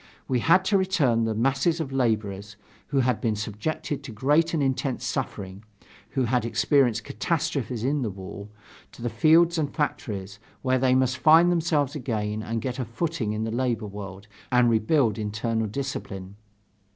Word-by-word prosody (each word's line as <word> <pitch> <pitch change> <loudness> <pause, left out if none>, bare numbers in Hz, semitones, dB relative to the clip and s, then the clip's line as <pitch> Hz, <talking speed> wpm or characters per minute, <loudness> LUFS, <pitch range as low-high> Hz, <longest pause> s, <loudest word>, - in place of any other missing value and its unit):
We 130 -2 +1
had 185 +8 +4
to 195 0 +3
return 145 - +2
the 110 -1 -1
masses 135 +8 +1
of 150 -4 -3
laborers, 105 -6 -1 0.3
who 140 -2 +1
had 125 -2 0
been 110 -3 0
subjected 140 +9 -3
to 135 - -8
great 145 +9 +2
and 155 -4 0
intense 135 -1 -1
suffering 95 +1 -4 0.5
who 130 - +3
had 125 0 +1
experienced 120 -1 +2
catastrophes 135 0 -2
in 140 +3 +1
the 115 - -1
war 100 +1 -8 0.5
to - - -11
the 120 - -1
fields 160 +8 +4
and 145 -2 -1
factories, 100 -9 -3 0.2
where 130 -1 +2
they 130 0 +3
must 130 0 +1
find 165 +3 +6
themselves 155 -5 +1
again 110 -6 -2
and 115 +1 -3
get 130 0 -3
a 130 - -1
footing 115 -2 -2
in 110 +1 -2
the 110 - -2
labor 120 -2 -1
world, 100 -1 -8 0.2
and 125 -1 +4
rebuild 115 0 +2
internal 110 +1 -1
discipline. 100 -6 -5
125 Hz, 165 wpm, -25 LUFS, 110-145 Hz, 0.5 s, find